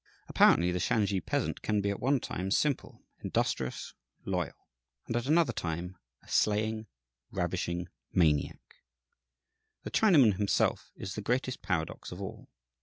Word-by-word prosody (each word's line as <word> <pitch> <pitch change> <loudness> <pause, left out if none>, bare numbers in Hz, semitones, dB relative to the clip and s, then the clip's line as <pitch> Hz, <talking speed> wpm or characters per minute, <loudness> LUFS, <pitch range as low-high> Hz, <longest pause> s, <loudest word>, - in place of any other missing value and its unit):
Apparently, 90 +1 +5
the 90 - -1
Shansi 100 0 +1
peasant - - -1
can 105 -1 0
be 100 0 0
at 100 - -4
one 135 +2 +2
time 95 -4 -4
simple, 140 +6 0 0.2
industrious, 65 -1 -2 0.3
loyal, 90 -6 -3 0.4
and 115 - -3
at 120 +2 -1
another 155 -4 +3
time 85 +1 -4 0.3
a - - -21
slaying, 110 +1 +1 0.4
ravishing 85 0 -2 0.2
maniac. 75 -5 +1 1.1
The - - -6
Chinaman 140 - +5
himself 100 -1 +1
is 95 - -6
the 105 - -4
greatest 125 +4 -1
paradox 80 -3 -3
of - - -7
all. - - -7
100 Hz, 135 wpm, -30 LUFS, 90-120 Hz, 1.1 s, Apparently